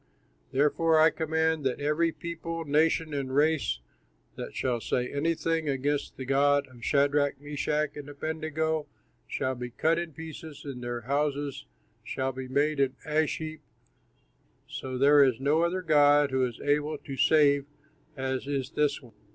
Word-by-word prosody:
Therefore 155 Hz, +4 st, +3 dB
I 160 Hz, +1 st, +6 dB
command 160 Hz, -1 st, 0 dB
that 130 Hz, -2 st, -1 dB
every 150 Hz, +3 st, +1 dB
people, 165 Hz, -1 st, -5 dB
nation, 155 Hz, +1 st, +2 dB
and 135 Hz, -2 st, -3 dB
race 145 Hz, -, +2 dB, 0.5 s
that -, -, -7 dB
shall 120 Hz, -3 st, -1 dB
say 125 Hz, +2 st, -1 dB
anything 160 Hz, +1 st, 0 dB
against 140 Hz, +1 st, -1 dB
the 130 Hz, -, -5 dB
God 140 Hz, +1 st, +3 dB
of 120 Hz, -2 st, -15 dB
Shadrach, 145 Hz, 0 st, +2 dB
Meshach, 150 Hz, +1 st, -2 dB
and 145 Hz, -1 st, -8 dB
Abednego 155 Hz, +1 st, -2 dB, 0.4 s
shall 130 Hz, -, -1 dB
be 125 Hz, -1 st, -6 dB
cut 160 Hz, +7 st, +1 dB
in 170 Hz, -2 st, -5 dB
pieces 160 Hz, -1 st, -9 dB
and 135 Hz, -3 st, -6 dB
their 120 Hz, 0 st, -3 dB
house 140 Hz, +1 st, -2 dB, 0.4 s
shall 130 Hz, +3 st, -2 dB
be 130 Hz, 0 st, -7 dB
made 145 Hz, +3 st, +1 dB
an 135 Hz, -1 st, +2 dB
ash 155 Hz, 0 st, +1 dB
heap, 155 Hz, 0 st, -6 dB, 1.2 s
for 130 Hz, -1 st, -4 dB
there 140 Hz, +2 st, +6 dB
is 130 Hz, -4 st, +2 dB
no 145 Hz, +4 st, +2 dB
other 180 Hz, +2 st, 0 dB
god 145 Hz, -3 st, +5 dB
who 130 Hz, -1 st, +2 dB
is 120 Hz, -, -9 dB
so -, -, -11 dB
able 150 Hz, +1 st, +1 dB
to 135 Hz, -1 st, -8 dB
save 140 Hz, -1 st, +4 dB, 0.5 s
as 130 Hz, 0 st, -2 dB
is 140 Hz, -2 st, -2 dB
this 145 Hz, -2 st, 0 dB
one." 120 Hz, -, -16 dB
145 Hz, 160 wpm, -28 LUFS, 135-155 Hz, 1.2 s, I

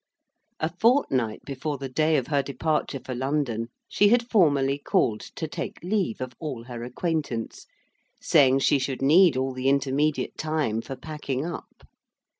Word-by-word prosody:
A 160 Hz, +1 st, -2 dB
fortnight 135 Hz, -, +2 dB
before 140 Hz, +2 st, -4 dB
the 135 Hz, 0 st, -5 dB
day 155 Hz, +4 st, +2 dB
of 130 Hz, -, -1 dB
her 145 Hz, -2 st, +1 dB
departure 140 Hz, +1 st, -2 dB
for 130 Hz, -, -6 dB
London, 130 Hz, -3 st, -1 dB, 0.2 s
she 205 Hz, -, +3 dB
had 235 Hz, +1 st, +3 dB
formally 145 Hz, -, +3 dB
called 110 Hz, -6 st, +1 dB, 0.2 s
to 160 Hz, -, -3 dB
take -, -, -5 dB
leave 185 Hz, -, -1 dB
of 130 Hz, -1 st, -4 dB
all 135 Hz, -7 st, -5 dB
her 120 Hz, -1 st, -7 dB
acquaintance; 130 Hz, -3 st, -3 dB, 0.5 s
saying 135 Hz, -1 st, +4 dB
she 140 Hz, -, +3 dB
should 135 Hz, 0 st, -3 dB
need 160 Hz, +1 st, +6 dB
all 130 Hz, 0 st, -1 dB
the 130 Hz, +1 st, 0 dB
intermediate 140 Hz, +2 st, 0 dB
time 155 Hz, -8 st, -1 dB
for 135 Hz, -, -7 dB
packing 140 Hz, 0 st, -4 dB
up. 170 Hz, -, -8 dB
140 Hz, 155 wpm, -26 LUFS, 130-155 Hz, 0.5 s, need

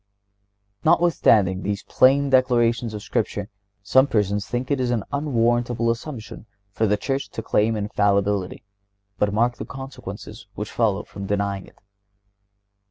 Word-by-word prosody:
(128) -, -, +2 dB
Notwithstanding 105 Hz, -, +3 dB
these 100 Hz, +1 st, -3 dB
plain 135 Hz, +2 st, +3 dB
declarations 120 Hz, -3 st, +2 dB
of 105 Hz, -, -7 dB
Scripture, 105 Hz, -1 st, -2 dB, 0.3 s
some 130 Hz, +7 st, +4 dB
persons 105 Hz, -4 st, 0 dB
think 125 Hz, +3 st, -3 dB
it 140 Hz, -, +1 dB
an 120 Hz, -4 st, 0 dB
unwarrantable 120 Hz, -4 st, +1 dB
assumption 115 Hz, -2 st, -7 dB, 0.2 s
for 110 Hz, +2 st, 0 dB
the 105 Hz, +1 st, +2 dB
Church 135 Hz, +5 st, -3 dB
to -, -, -6 dB
claim 110 Hz, +2 st, +1 dB
infallibility. 100 Hz, -2 st, 0 dB, 0.6 s
But 105 Hz, -, +2 dB
mark 120 Hz, +4 st, +1 dB
the -, -, -6 dB
consequences 115 Hz, -4 st, -9 dB
that 105 Hz, -, -3 dB
follow 105 Hz, -4 st, 0 dB
from 100 Hz, -1 st, -8 dB
denying 100 Hz, -1 st, -2 dB
it. -, -, -20 dB
115 Hz, 135 wpm, -23 LUFS, 100-125 Hz, 0.6 s, some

